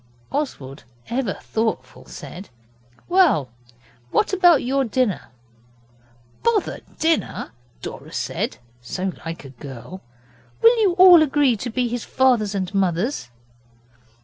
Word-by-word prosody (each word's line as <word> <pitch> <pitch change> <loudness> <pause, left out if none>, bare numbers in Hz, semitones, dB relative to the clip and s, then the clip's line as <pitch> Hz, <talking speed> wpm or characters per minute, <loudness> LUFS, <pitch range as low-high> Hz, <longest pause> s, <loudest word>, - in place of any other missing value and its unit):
Oswald, 150 - -4 0.3
ever 240 -4 -1
thoughtful, 225 0 -3
said 185 +3 -10 0.6
'Well, 310 - +3 0.6
what - - +1
about 350 -6 +5
your 270 +2 +1
dinner?' 240 -4 0 1.2
'Bother 460 -4 0 0.2
dinner!' 320 - 0 0.3
Dora - - -8
said - - -3 0.2
so 185 +10 -3
like 165 -2 -7
a - - -9
girl. 135 +6 -10 0.6
'Will 460 +1 +6
you 390 -4 +3
all 360 -2 +8
agree 285 -4 +3
to 240 - -5
be 245 +1 0
his 240 0 -3
fathers 235 -6 +2
and 190 -1 -3
mothers? 190 - 0
240 Hz, 115 wpm, -22 LUFS, 185-300 Hz, 1.2 s, all